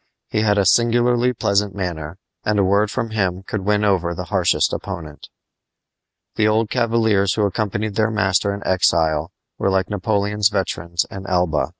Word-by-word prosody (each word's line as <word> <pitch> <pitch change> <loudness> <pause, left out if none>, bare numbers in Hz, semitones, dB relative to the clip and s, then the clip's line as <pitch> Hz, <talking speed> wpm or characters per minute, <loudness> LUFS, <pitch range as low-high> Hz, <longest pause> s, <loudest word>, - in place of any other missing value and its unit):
He 110 - 0
had 105 -1 +2
a 100 - +2
singularly 120 +3 +3
pleasant 100 -4 0
manner, 85 -4 -5 0.3
and 105 -1 0
a 100 - +3
word 100 +3 +2
from 115 +1 -3
him 95 -3 -1
could 105 +1 -4
win 105 +2 +1
over 90 -4 +1
the 90 - -4
harshest 90 -3 +2
opponent. 75 -3 -7 1.1
The 105 - +3
old 110 0 +1
cavaliers 110 -5 +2
who 105 - +1
accompanied 105 +1 -2
their 110 +1 +1
master 100 -2 +1
in 100 0 -6
exile 80 -4 +1 0.3
were - - +1
like 95 0 0
Napoleon's 105 0 +1
veterans 85 -4 -2
in 95 0 -8
Elba. 90 -4 +1
100 Hz, 165 wpm, -20 LUFS, 90-110 Hz, 1.1 s, singularly